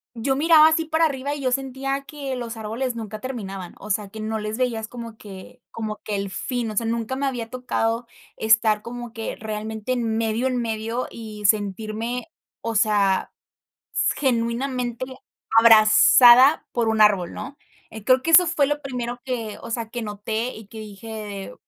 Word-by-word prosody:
yo 265 Hz, +4 st, 0 dB
miraba 315 Hz, +1 st, +6 dB
así 320 Hz, 0 st, +1 dB
para 320 Hz, +1 st, +2 dB
arriba, 280 Hz, -1 st, -2 dB
y 290 Hz, -, -7 dB
yo 255 Hz, -2 st, 0 dB
sentía 270 Hz, +1 st, -2 dB
que 280 Hz, -3 st, -5 dB
los 240 Hz, -2 st, -6 dB
árboles 235 Hz, +3 st, -3 dB
nunca 215 Hz, -2 st, -6 dB
terminaban. 195 Hz, -8 st, -6 dB
O 215 Hz, -, -6 dB
sea, 205 Hz, 0 st, -1 dB
que 220 Hz, -, -10 dB
no 220 Hz, 0 st, -3 dB
les 215 Hz, +1 st, -4 dB
veías 230 Hz, -4 st, -1 dB
como 230 Hz, -2 st, -9 dB
que 195 Hz, -5 st, -12 dB
como 215 Hz, -1 st, -5 dB
que 210 Hz, -, -3 dB
el 200 Hz, -1 st, -3 dB
fin. 240 Hz, +2 st, -3 dB
O -, -, -8 dB
sea, 230 Hz, -, +1 dB
nunca 230 Hz, +2 st, -2 dB
me 275 Hz, +1 st, -1 dB
había 235 Hz, -4 st, -4 dB
tocado 235 Hz, -2 st, -2 dB, 0.3 s
estar 220 Hz, -1 st, +3 dB
como 240 Hz, 0 st, -8 dB
que 225 Hz, -1 st, -5 dB
realmente, 215 Hz, +1 st, -5 dB
en 225 Hz, -3 st, -1 dB
medio, 225 Hz, +3 st, 0 dB
en 255 Hz, -1 st, -1 dB
medio, 225 Hz, +2 st, -3 dB
y 215 Hz, -2 st, -8 dB
sentirme 215 Hz, -, -1 dB, 0.3 s
O 230 Hz, 0 st, -3 dB
sea, 205 Hz, -3 st, +2 dB, 0.6 s
s -, -, +1 dB
genuinamente, 245 Hz, -1 st, -1 dB, 0.5 s
abrazada 235 Hz, +4 st, +7 dB
por 235 Hz, -2 st, 0 dB
un 220 Hz, -1 st, +3 dB
árbol, 195 Hz, -5 st, +3 dB
¿no? 280 Hz, +2 st, -8 dB, 0.3 s
Eh, 220 Hz, -2 st, -9 dB
creo 255 Hz, 0 st, +4 dB
que 330 Hz, -, -1 dB
eso 355 Hz, +2 st, +8 dB
fue 305 Hz, -4 st, +2 dB
lo 295 Hz, +1 st, -1 dB
primero 245 Hz, -3 st, -5 dB
que 230 Hz, -5 st, -4 dB
o -, -, -9 dB
sea, 225 Hz, -1 st, -3 dB
que 240 Hz, -, -4 dB
noté, 220 Hz, +3 st, -3 dB
y 220 Hz, -, -11 dB
que 220 Hz, +2 st, -11 dB
dije 210 Hz, 0 st, -8 dB
230 Hz, 180 wpm, -23 LUFS, 215-255 Hz, 0.6 s, eso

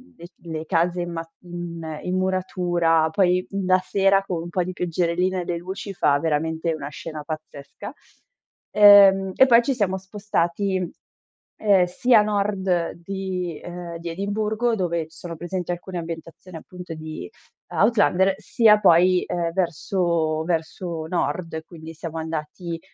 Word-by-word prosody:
le 170 Hz, -, -12 dB
c -, -, -34 dB
le 160 Hz, -1 st, -5 dB
case 175 Hz, +1 st, +1 dB
in 175 Hz, 0 st, -4 dB
ma 165 Hz, 0 st, -5 dB
in 170 Hz, -3 st, -7 dB
in 180 Hz, +1 st, -2 dB
muratura. 175 Hz, -3 st, +1 dB
Poi 180 Hz, 0 st, +2 dB
la 185 Hz, -1 st, +2 dB
sera, 195 Hz, +1 st, +2 dB
con 180 Hz, -4 st, -3 dB
un 170 Hz, -, -7 dB
po' 180 Hz, +1 st, 0 dB
di 185 Hz, -, -4 dB
pioggerellina 180 Hz, +1 st, -1 dB
e 175 Hz, -, -6 dB
le 175 Hz, -, -2 dB
luci, 190 Hz, +3 st, -6 dB
fa 145 Hz, -5 st, +2 dB
veramente 160 Hz, +2 st, -1 dB
una 145 Hz, -2 st, -6 dB
scena 155 Hz, 0 st, -7 dB
pazzesca. 155 Hz, -2 st, -8 dB, 0.8 s
Ehm, 195 Hz, -2 st, +7 dB
e 265 Hz, -, +7 dB
poi 235 Hz, -1 st, +7 dB
ci 270 Hz, +3 st, 0 dB
siamo 195 Hz, -5 st, 0 dB
spostati, 190 Hz, -1 st, -1 dB, 0.8 s
ehm, 200 Hz, -4 st, +4 dB
sia 230 Hz, +6 st, +3 dB
a 210 Hz, -, +4 dB
nord 195 Hz, -4 st, 0 dB
di 185 Hz, -3 st, -4 dB
ehm, 175 Hz, -1 st, -7 dB
di 170 Hz, 0 st, -6 dB
Edimburgo, 215 Hz, +5 st, -1 dB
dove 170 Hz, -5 st, -1 dB
sono 165 Hz, +1 st, -8 dB
presenti 175 Hz, +1 st, -4 dB
alcune 175 Hz, +1 st, -5 dB
ambientazioni 165 Hz, +2 st, -8 dB
appunto 180 Hz, +1 st, -9 dB
di 155 Hz, -, -7 dB, 0.4 s
Outlander, 195 Hz, -3 st, +3 dB
sia 215 Hz, -1 st, +4 dB
poi, 180 Hz, 0 st, +5 dB
ehm, 170 Hz, -1 st, -1 dB
verso 170 Hz, -3 st, 0 dB
verso 165 Hz, -1 st, -3 dB
nord, 165 Hz, -1 st, -2 dB
quindi 160 Hz, -1 st, -11 dB
siamo 165 Hz, 0 st, -7 dB
andati, 160 Hz, +2 st, -5 dB
175 Hz, 145 wpm, -23 LUFS, 165-190 Hz, 0.8 s, Ehm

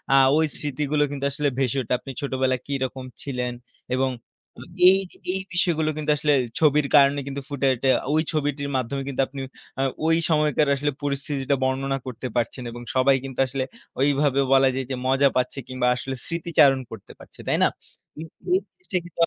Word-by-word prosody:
আ -, -, +7 dB, 0.2 s
ওই 160 Hz, -, +4 dB
স্মৃতিগুলো 150 Hz, +1 st, 0 dB
কিন্তু 140 Hz, -1 st, -3 dB
আসলে 145 Hz, +1 st, -1 dB
ভেসে 135 Hz, 0 st, 0 dB
ওঠে 125 Hz, -, -2 dB
আপনি 135 Hz, -, -8 dB
ছোটবেলায় 130 Hz, -2 st, 0 dB
কিরকম 130 Hz, -2 st, -3 dB, 0.2 s
ছিলেন? 125 Hz, -3 st, -3 dB, 0.4 s
এবং 130 Hz, +1 st, +1 dB, 0.5 s
অ -, -, -10 dB, 0.3 s
এইযে 190 Hz, -1 st, +3 dB, 0.2 s
এই 190 Hz, -, -2 dB
বিষয়গুলো 170 Hz, -3 st, +1 dB
কিন্তু 150 Hz, 0 st, 0 dB
আসলে 150 Hz, +1 st, +2 dB, 0.3 s
ছবির 150 Hz, -2 st, +4 dB
কারণে 140 Hz, 0 st, +6 dB
কিন্তু 140 Hz, 0 st, -4 dB
ফুটে 140 Hz, -1 st, 0 dB
উঠে, 130 Hz, +2 st, 0 dB, 0.2 s
ঐ -, -, +1 dB, 0.2 s
ছবিটির 145 Hz, -2 st, -1 dB
মাধ্যমে 130 Hz, +2 st, -2 dB
কিন্তু 135 Hz, -1 st, 0 dB
আপনি 135 Hz, 0 st, -7 dB, 0.7 s
ওই 165 Hz, -, +4 dB
সময়কার 150 Hz, -1 st, +2 dB
আসলে 145 Hz, +1 st, -1 dB
পরিস্থিতিটা 140 Hz, -1 st, -1 dB
বর্ণনা 135 Hz, +1 st, 0 dB
করতে 130 Hz, 0 st, -5 dB
পারছেন। 120 Hz, +2 st, -1 dB
এবং 120 Hz, -, -8 dB
সবাই 130 Hz, +1 st, +5 dB
কিন্তু 130 Hz, -2 st, -8 dB
আসলে 130 Hz, 0 st, -2 dB, 0.4 s
ওইভাবে 140 Hz, 0 st, +3 dB
বলা 135 Hz, 0 st, +6 dB
যায় 130 Hz, -1 st, -2 dB
যে, -, -, 0 dB
মজা 135 Hz, +1 st, +4 dB
পাচ্ছে 125 Hz, +2 st, 0 dB
কিংবা 130 Hz, -1 st, -1 dB
আসলে 130 Hz, +1 st, -4 dB
স্মৃতিচারণ 160 Hz, -5 st, +3 dB
করতে 110 Hz, -3 st, -10 dB
পারছে। -, -, -16 dB
তাই -, -, +2 dB
না? -, -, +6 dB, 0.5 s
কিন্তু 160 Hz, +1 st, -10 dB, 0.2 s
এই 375 Hz, -, +4 dB
জিনিস্টা 360 Hz, -, -5 dB
কিন্তু 175 Hz, -, -13 dB
140 Hz, 175 wpm, -24 LUFS, 130-150 Hz, 0.7 s, আ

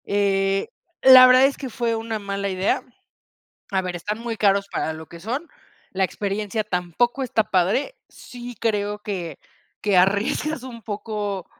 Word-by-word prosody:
Eh, 195 Hz, -1 st, +1 dB, 0.4 s
la 255 Hz, -1 st, +10 dB
verdad 255 Hz, +1 st, +7 dB
es 275 Hz, -, 0 dB
que 270 Hz, -, -6 dB
fue 230 Hz, 0 st, -1 dB
una 225 Hz, -1 st, -4 dB
mala 200 Hz, 0 st, -3 dB
idea. 190 Hz, +1 st, 0 dB, 0.9 s
A 190 Hz, -, +1 dB
ver, 180 Hz, -1 st, -4 dB
están 210 Hz, +5 st, -4 dB
muy 230 Hz, -1 st, -4 dB
caros 200 Hz, -1 st, +2 dB
para 160 Hz, -, -2 dB
lo 160 Hz, 0 st, -9 dB
que 170 Hz, +1 st, -12 dB
son. 255 Hz, -, -4 dB, 0.4 s
La 190 Hz, 0 st, 0 dB
experiencia 205 Hz, +3 st, -2 dB
tampoco 210 Hz, -, -1 dB
está 225 Hz, -4 st, +1 dB
padre. 215 Hz, -, 0 dB
Sí 245 Hz, -1 st, -10 dB
creo 210 Hz, -2 st, -1 dB
que 180 Hz, -8 st, -5 dB, 0.4 s
que 200 Hz, -3 st, +3 dB
arriesgas 205 Hz, +10 st, +1 dB
un 250 Hz, -3 st, -9 dB
poco 205 Hz, -3 st, -4 dB
205 Hz, 155 wpm, -23 LUFS, 195-235 Hz, 0.9 s, la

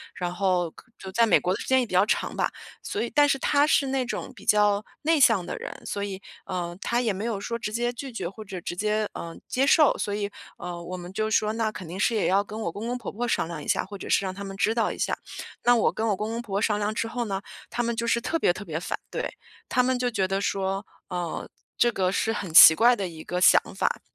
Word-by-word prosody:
然 175 Hz, -1 st, -3 dB
后 180 Hz, -3 st, 0 dB, 0.3 s
就 190 Hz, -, -8 dB
在 230 Hz, +4 st, +4 dB
美 195 Hz, -, +5 dB
国 180 Hz, -, 0 dB
的 -, -, -4 dB
时 -, -, -7 dB
间 260 Hz, 0 st, +4 dB
也 250 Hz, -, +1 dB
比 215 Hz, -, -10 dB
较 185 Hz, +2 st, +5 dB
长 -, -, 0 dB
吧， -, -, +1 dB, 0.3 s
所 -, -, -3 dB
以 235 Hz, -, -2 dB
但 290 Hz, 0 st, +6 dB
是 270 Hz, -, +2 dB
他 285 Hz, +2 st, +3 dB
是 285 Hz, -2 st, +3 dB
那 265 Hz, -1 st, 0 dB
种 -, -, -5 dB
比 -, -, -14 dB
较 210 Hz, -1 st, +3 dB, 0.2 s
内 320 Hz, 0 st, +3 dB
向 225 Hz, -10 st, +5 dB
的 -, -, -4 dB
人， -, -, -6 dB
所 200 Hz, -, -3 dB
以， 195 Hz, -1 st, -5 dB, 0.2 s
呃， 175 Hz, -2 st, -4 dB
他 235 Hz, -, 0 dB
也 225 Hz, -4 st, 0 dB
没 195 Hz, +3 st, -5 dB
有 225 Hz, -4 st, -2 dB
说 230 Hz, +4 st, -3 dB
直 220 Hz, -2 st, -4 dB
接 240 Hz, +2 st, -1 dB
拒 265 Hz, +2 st, -7 dB
绝 190 Hz, -7 st, -4 dB
或 215 Hz, +3 st, -10 dB
者 190 Hz, -3 st, -7 dB
直 175 Hz, -, -5 dB
接， 210 Hz, +2 st, 0 dB
嗯， 165 Hz, 0 st, -7 dB
接 265 Hz, +2 st, +1 dB
受。 300 Hz, +1 st, +5 dB
所 205 Hz, -, -2 dB
以， 205 Hz, 0 st, -2 dB, 0.3 s
呃， 175 Hz, -1 st, -6 dB
我 185 Hz, +2 st, -6 dB
们 175 Hz, 0 st, -8 dB
就 215 Hz, +2 st, -1 dB
说 215 Hz, 0 st, +2 dB
那 225 Hz, -1 st, 0 dB
肯 185 Hz, -5 st, -8 dB
定 175 Hz, -, -7 dB
是 230 Hz, -, +2 dB
也 210 Hz, -, +1 dB
要 195 Hz, +2 st, +3 dB
跟 215 Hz, +2 st, -8 dB
我 170 Hz, -, -2 dB
公 215 Hz, +7 st, -6 dB
公 245 Hz, -, -2 dB
婆 240 Hz, -, -6 dB
婆 235 Hz, +4 st, -3 dB
商 220 Hz, -, 0 dB
量 165 Hz, -3 st, -6 dB
一 -, -, -10 dB
下， -, -, +1 dB
或 200 Hz, +1 st, -8 dB
者 -, -, -8 dB
是 200 Hz, -, +3 dB
让 185 Hz, -, -3 dB
他 200 Hz, +2 st, -7 dB
们 195 Hz, -1 st, -7 dB
知 220 Hz, +2 st, +2 dB
道 225 Hz, -2 st, +1 dB
一 -, -, -7 dB
下。 -, -, 0 dB, 0.5 s
那 245 Hz, 0 st, +5 dB
我 230 Hz, -, +3 dB
跟 225 Hz, -, -1 dB
我 205 Hz, -, +2 dB
公 210 Hz, +3 st, -3 dB
公 230 Hz, -, -3 dB
婆 215 Hz, -5 st, -9 dB
婆 200 Hz, -, +1 dB
商 210 Hz, -2 st, +1 dB
量 210 Hz, +1 st, -1 dB
之 225 Hz, -, -2 dB
后 240 Hz, +1 st, -3 dB
呢， 195 Hz, -2 st, -3 dB, 0.3 s
他 240 Hz, 0 st, -1 dB
们 235 Hz, 0 st, -1 dB
就 235 Hz, +1 st, -2 dB
是 235 Hz, -, +2 dB
特 330 Hz, +7 st, -1 dB
别 175 Hz, -, +3 dB
特 205 Hz, -, -8 dB
别 160 Hz, -1 st, -3 dB
反 -, -, -3 dB
对， -, -, -4 dB, 0.3 s
他 250 Hz, -, +3 dB
们 255 Hz, 0 st, +1 dB
就 245 Hz, 0 st, +1 dB
觉 195 Hz, -5 st, 0 dB
得 195 Hz, +1 st, -1 dB
说， 195 Hz, 0 st, -1 dB, 0.2 s
呃， 175 Hz, -3 st, -4 dB, 0.3 s
这 240 Hz, -, +4 dB
个 185 Hz, -4 st, 0 dB
是 220 Hz, +3 st, 0 dB
很 190 Hz, -6 st, -5 dB
奇 160 Hz, -1 st, +11 dB
怪 240 Hz, +6 st, +5 dB
的 195 Hz, -4 st, -3 dB
一 160 Hz, -2 st, -9 dB
个 180 Hz, -, -3 dB
想 -, -, +7 dB
法。 -, -, 0 dB
210 Hz, 300 characters per minute, -26 LUFS, 185-235 Hz, 0.5 s, 奇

